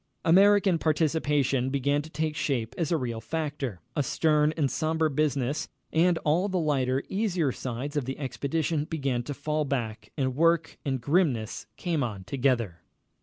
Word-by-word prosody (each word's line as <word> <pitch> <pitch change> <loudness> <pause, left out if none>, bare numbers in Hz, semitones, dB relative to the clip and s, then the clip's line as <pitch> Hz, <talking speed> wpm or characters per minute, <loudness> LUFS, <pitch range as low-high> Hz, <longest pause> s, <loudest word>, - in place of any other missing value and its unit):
] - - -23
American 195 0 +5
participation 150 -5 +1
began 140 +1 +1
to 155 - -11
take 155 +1 -2
shape 120 -7 -1
as 165 -2 -1
a 165 - +3
real 120 -5 -3
factor, 140 - -3
a - - +2
stern 150 +1 +2
and 145 -4 +1
sombre 160 -1 0
business, 145 -1 0 0.3
and 170 +1 +4
all 170 +7 +2
the 185 - 0
lighter, 135 -5 +1
easier 185 -8 0
sides 130 +4 -5
of 145 -4 0
the 135 +1 -4
expedition 150 +2 -1
began 135 -6 -1
to 140 +4 -6
fall 150 +2 -1
back, 115 -6 -3
and 130 -3 0
work 165 +2 +2
and 135 -3 -1
grimness 135 - 0
came 170 -4 -1
on 105 -7 -3
together. 120 -5 0
145 Hz, 165 wpm, -27 LUFS, 130-160 Hz, 0.3 s, American